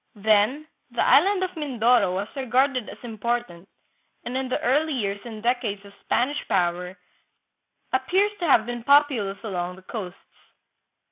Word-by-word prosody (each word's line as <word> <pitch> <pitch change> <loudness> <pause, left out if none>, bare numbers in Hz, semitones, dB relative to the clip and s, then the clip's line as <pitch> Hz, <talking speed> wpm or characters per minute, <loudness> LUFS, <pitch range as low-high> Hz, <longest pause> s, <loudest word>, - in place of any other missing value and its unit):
Then 215 +7 +2 0.2
the 240 - 0
island 375 +8 +4
of 370 0 -4
Mindoro 245 - +2
was 200 +2 -2
regarded 260 -1 +1
as - - -10
important, 230 -5 -4 0.6
and 240 +2 -4
in 260 -1 -2
the 255 - -1
early 295 +5 +1
years 200 -5 -2
and 220 -2 -8
decades 230 -5 -1
of 200 - -14
Spanish 275 +5 0
power 180 +1 -1 1.0
appears 370 +11 +2
to 345 - -1
have 230 -6 +5
been 240 -1 -5
populous 270 -8 +3
along 180 -4 -3
the 190 - -16
coasts. 185 -3 -6
240 Hz, 145 wpm, -24 LUFS, 200-270 Hz, 1.0 s, have